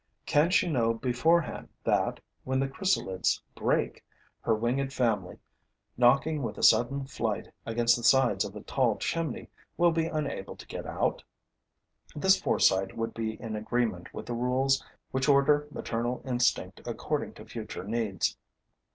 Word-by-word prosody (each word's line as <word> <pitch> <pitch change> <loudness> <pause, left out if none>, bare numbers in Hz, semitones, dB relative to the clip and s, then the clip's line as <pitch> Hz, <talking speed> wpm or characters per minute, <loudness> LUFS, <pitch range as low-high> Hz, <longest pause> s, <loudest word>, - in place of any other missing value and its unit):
Can 150 +3 +3
she 185 0 +3
know 115 -7 +1
beforehand 140 +7 +1
that, - - +1 0.2
when 130 0 0
the 135 - +1
chrysalides 135 - 0
break, - - -1 0.4
her 115 - +1
winged 125 +5 -1
family, 110 -9 0 0.6
knocking 140 +5 +3
with 120 - -4
a - - -5
sudden 130 +5 +4
flight 115 -5 -3 0.2
against 120 +1 +3
the 120 - -7
sides 120 -4 +4
of 100 - -7
a 105 - -7
tall 125 -5 +1
chimney, 165 -2 -3 0.3
will 175 0 +5
be 165 0 0
unable 150 -11 -3
to - - -12
get - - -7
out? - - -1 0.9
This 190 +5 +4
foresight 95 - +2
would 115 0 -2
be 110 -1 -4
in 110 -2 -5
agreement 110 -4 -2
with - - -7
the 120 - -4
rules 130 +3 +1 0.3
which 130 +2 0
order 145 +1 +4
maternal 120 -2 -3
instinct 125 -2 0
according - - -3
to - - -11
future 105 -5 -7
needs. 105 -3 -1
125 Hz, 150 wpm, -29 LUFS, 115-140 Hz, 0.9 s, will